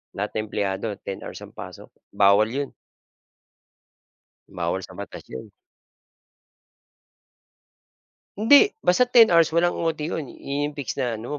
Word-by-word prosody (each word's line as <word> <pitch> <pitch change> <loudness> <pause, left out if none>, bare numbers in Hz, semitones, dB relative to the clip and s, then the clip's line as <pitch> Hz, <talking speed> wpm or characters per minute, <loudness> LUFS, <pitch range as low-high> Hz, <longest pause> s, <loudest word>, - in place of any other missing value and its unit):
Lahat 105 +1 -3
ng 110 0 -3
empleyado 100 +1 -3
10 95 - -5
hours - - -9
ang - - -12
pasok, - - -11 0.2
bawal 100 +2 +5
yun. 140 +3 -4 1.8
Bawal - - -3
sa - - -12
batas - - -8
yun. 65 - -9 2.9
Hindi, 285 - +5
basta 180 +8 +3
10 235 -3 +6
hours 165 -1 +5
walang 175 +1 +2
OT 165 -2 -1
yun. 155 -3 -4
Yun 145 +1 -4
yung 150 - -10
fix 140 -3 -4
na 120 -3 -1
ano 120 +7 -6
140 Hz, 130 wpm, -23 LUFS, 105-170 Hz, 2.9 s, 10